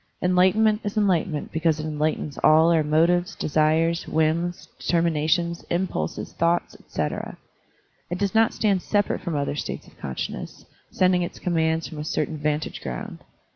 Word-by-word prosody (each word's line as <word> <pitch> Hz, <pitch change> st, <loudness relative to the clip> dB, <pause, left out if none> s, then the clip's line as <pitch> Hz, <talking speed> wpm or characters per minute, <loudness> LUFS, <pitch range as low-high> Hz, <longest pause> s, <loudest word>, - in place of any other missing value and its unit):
Enlightenment 190 Hz, +4 st, +3 dB
is 205 Hz, 0 st, -4 dB
enlightenment 175 Hz, -7 st, +1 dB
because 160 Hz, -1 st, +1 dB
it 155 Hz, -, -3 dB
enlightens 150 Hz, -1 st, -2 dB
all 160 Hz, +2 st, +5 dB
our 165 Hz, -2 st, +4 dB
motives, 170 Hz, +4 st, +2 dB
desires, 160 Hz, +2 st, +1 dB
whims, 160 Hz, +3 st, 0 dB
determinations, 170 Hz, 0 st, +1 dB
impulses, 180 Hz, +2 st, -2 dB
thoughts, 170 Hz, +1 st, +1 dB
etc. -, -, -4 dB, 0.7 s
It 175 Hz, -, -2 dB
does 200 Hz, -1 st, -1 dB
not 225 Hz, +1 st, +4 dB
stand 200 Hz, -4 st, +1 dB
separate 205 Hz, +1 st, 0 dB
from 170 Hz, -3 st, -3 dB
other 145 Hz, 0 st, -1 dB
states -, -, -5 dB
of -, -, -20 dB
consciousness, 65 Hz, -1 st, -5 dB, 0.2 s
sending 185 Hz, -1 st, +2 dB
its 175 Hz, -, -4 dB
com 180 Hz, -, -2 dB
mands 160 Hz, 0 st, +1 dB
from 155 Hz, -, -8 dB
a -, -, -3 dB
certain 155 Hz, 0 st, -2 dB
vantage 150 Hz, +1 st, -2 dB
ground. 60 Hz, -2 st, -6 dB
165 Hz, 150 wpm, -24 LUFS, 155-180 Hz, 0.7 s, all